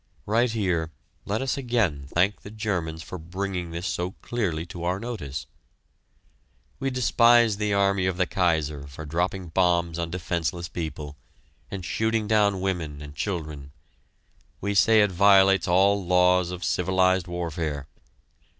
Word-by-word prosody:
Right 115 +4 +2
here 90 -7 0 0.4
let 110 +5 -1
us 135 - -1
again 110 - 0
thank 90 +7 +1
the - - -10
Germans 90 -7 -3
for 90 - -7
bringing 90 +1 -4
this 85 +2 -5
so 90 -2 -2
clearly 90 -9 -2
to 85 -1 -8
our 90 +2 -1
notice. 105 - -5 1.3
We 135 0 -1
despise 120 -3 +4
the 105 -1 0
army 100 -1 +2
of 95 -1 -1
the 90 - +2
Kaiser 80 -6 0
for 70 +3 -9
dropping 90 +3 -2
bombs 85 -1 +1
on 85 -1 -2
defenseless 85 0 -3
people, 75 -3 -6 0.5
and 95 -3 -6
shooting 110 +3 0
down 105 -3 +2
women 85 -6 -2
and 75 0 -9
children 75 -5 -5 0.9
we 100 +1 -2
say 110 +2 +5
it 105 -2 +2
violates 95 0 +5
all 95 +3 +3
laws 90 0 +3
of 90 -1 -6
civilized 95 0 +2
warfare. 80 -4 -3
90 Hz, 140 wpm, -25 LUFS, 85-100 Hz, 1.3 s, say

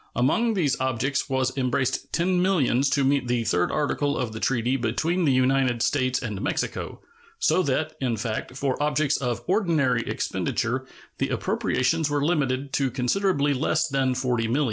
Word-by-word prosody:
Among 220 - +2
these 150 -8 +1
objects 130 +2 -1
was 130 -1 0
embraced 130 -1 -1
ten 180 +1 +1
millions 140 -8 +2
to 140 0 +1
meet 135 -1 +1
the 120 -1 0
third 90 -5 +1
article 145 -1 0
of 125 -4 -2
the 110 - -6
treaty 125 +1 0
between 155 +9 0
the 140 - +4
United 130 -2 +2
States 130 -1 +1
and 105 -5 -5
Mexico; - - -3 0.4
so 455 - +2
that, 155 0 -1
in 120 -4 0
fact, 110 +3 -4
for 135 0 -1
objects 150 0 +1
of 120 -2 -3
ordinary 160 - +2
expenditure 130 +3 -2 0.3
the - - 0
appropriations 155 +4 0
were 145 -1 0
limited 140 -4 0
to 135 -2 +1
considerably 145 +4 +1
less 155 +4 +1
than 135 -3 0
$40,000,000. 125 0 0
135 Hz, 160 wpm, -25 LUFS, 125-150 Hz, 0.4 s, the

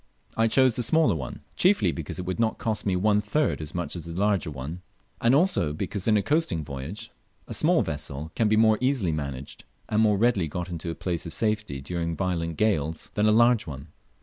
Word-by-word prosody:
I 115 0 +3
chose 130 +1 +3
the - - 0
smaller 160 - +3
one, 70 -6 -6
chiefly 180 - +3
because 80 -3 -6
it 90 - -5
would 95 +4 -3
not 115 -1 +1
cost 110 -2 -2
me 95 - +2
one 105 +3 +2
third 125 - 0
as 75 +1 -7
much 90 0 -3
as 85 -2 -6
the 85 +2 -5
larger 100 -5 +1
one, 75 +5 -6 0.4
and 120 +3 +4
also 160 - +2
because 95 +6 -4
in 110 -1 +5
a 100 - +1
coasting 145 - 0
voyage 70 +8 -7 0.4
a - - -6
small - - +3
vessel 75 +4 -5
can 115 - +1
be 110 - +3
more 110 -1 +4
easily 125 -9 +1
managed, 70 -3 -5 0.3
and 110 0 +2
more 105 -2 +3
readily 105 -6 +2
got 90 +3 -5
into 85 -1 -5
a 80 - -4
place 85 -2 -3
of 80 - -6
safety 105 -11 -1
during 85 +2 -3
violent 85 -3 -2
gales, 80 -7 0
than 105 0 +2
a - - +5
large 120 0 +4
one. 70 +1 -8
95 Hz, 215 wpm, -26 LUFS, 80-110 Hz, 0.4 s, in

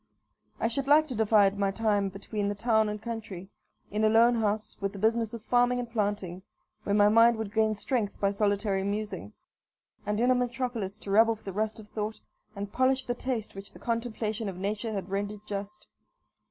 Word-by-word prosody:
I - - +1
should 270 +4 -2
like 300 +2 +6
to - - -2
divide 210 -3 +3
my 200 -1 +2
time 205 -1 +1
between 200 +2 -4
the 205 - -1
town 220 0 +2
and 210 0 -4
country; 220 -5 -6 0.4
in 210 +2 0
a 215 - +5
lone 230 +2 +5
house, 215 -2 -1
with 195 0 -2
the - - -8
business 225 +2 +1
of 225 - -9
farming 245 +1 +3
and 245 -1 -3
planting, 205 -5 -2 0.4
where 200 - 0
my 205 0 +6
mind 230 +2 +6
would 215 -2 -5
gain 220 -1 +2
strength 210 -1 -2
by 200 -1 +2
solitary 200 -1 0
musing, 200 - -4 0.7
and 210 +1 -1
in 245 +2 +4
a - - +6
metropolis 245 -5 -2
to 200 - -6
rub 225 +3 +6
off 225 -1 -2
the 195 - -6
rust 215 +2 -2
of 215 - -11
thought, 215 0 -4 0.4
and 200 0 -6
polish 260 +1 +2
the 245 - -1
taste 245 -3 -3
which 195 0 -10
the - - -12
contemplation 230 -2 -2
of 185 - -7
nature 210 +4 -2
had 195 -3 -4
rendered 205 +1 -3
just. 205 +1 -6
215 Hz, 200 wpm, -28 LUFS, 200-230 Hz, 0.7 s, like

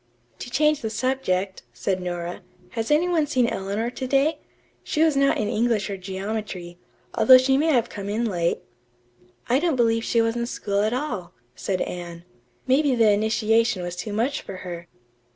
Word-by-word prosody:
"To - - -7
change 300 +3 +2
the 220 - -2
subject," 200 -7 -1
said 190 -2 -2
Nora, 175 -1 -4 0.3
"has 225 -1 -3
any 305 +4 +3
one 325 -4 +1
seen 255 -4 +2
Eleanor 205 +2 -2
to 260 +1 -5
day? 275 +4 +2 0.4
She 310 - +1
was 315 -3 +3
not 275 0 +3
in 215 - -1
English 220 -3 0
or 195 - -4
geometry, 190 -2 -5 0.3
although 260 -1 +8
she 265 +1 +3
may 300 +4 +2
have 245 -7 +3
come 200 -1 -6
in 225 +3 0
late." 175 -5 0 0.9
"I 255 +3 +3
don't 330 -2 +1
believe 230 -2 +2
she 230 - +1
was 225 0 +1
in 235 0 -2
school 200 -3 -1
at 215 +1 +1
all," 235 - -3 0.2
said 190 -2 -2
Anne. 175 -1 -6 0.4
"Maybe 270 +1 +3
the 225 -3 +5
initiation 220 -1 +2
was 175 0 -4
too 210 +4 -5
much 235 +7 -1
for 195 - -8
her." 175 -1 -7
225 Hz, 180 wpm, -24 LUFS, 195-260 Hz, 0.9 s, although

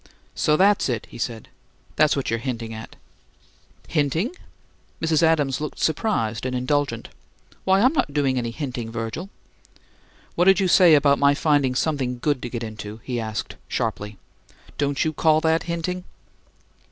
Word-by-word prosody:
"So 150 0 +2
that's 200 -3 +3
it," 120 -3 -2
he - - -10
said. 115 -2 -4 0.5
"That's 155 -1 +4
what 135 -4 -2
you're 115 - 0
hinting 115 -2 -4
at." 110 0 -9 0.9
"'Hinting?'" 160 - 0 0.6
Mrs. 160 -2 +1
Adams 150 -5 +2
looked 150 - -5
surprised 115 - 0
and 130 0 -2
indulgent. 130 -2 -1 0.6
"Why, 190 +1 +4
I'm 255 +6 +4
not 220 - 0
doing 135 -3 +1
any 120 -1 -2
hinting, 125 -3 -5
Virgil." 115 - -5 1.0
"What 175 - +2
did 195 +1 +6
you 190 - +2
say 175 -3 +7
about 140 -1 +4
my 140 0 +4
finding 145 -4 +2
'something 130 -4 -1
good 140 +1 0
to 120 - -5
get 120 -1 -4
into?'" 110 -1 -7
he 125 -2 -3
asked, 110 -2 -4
sharply. 105 0 -3 0.6
"Don't 140 0 0
you 155 - 0
call 155 +1 +3
that 160 0 +1
hinting?" 180 +2 -3
140 Hz, 155 wpm, -23 LUFS, 120-160 Hz, 1.0 s, say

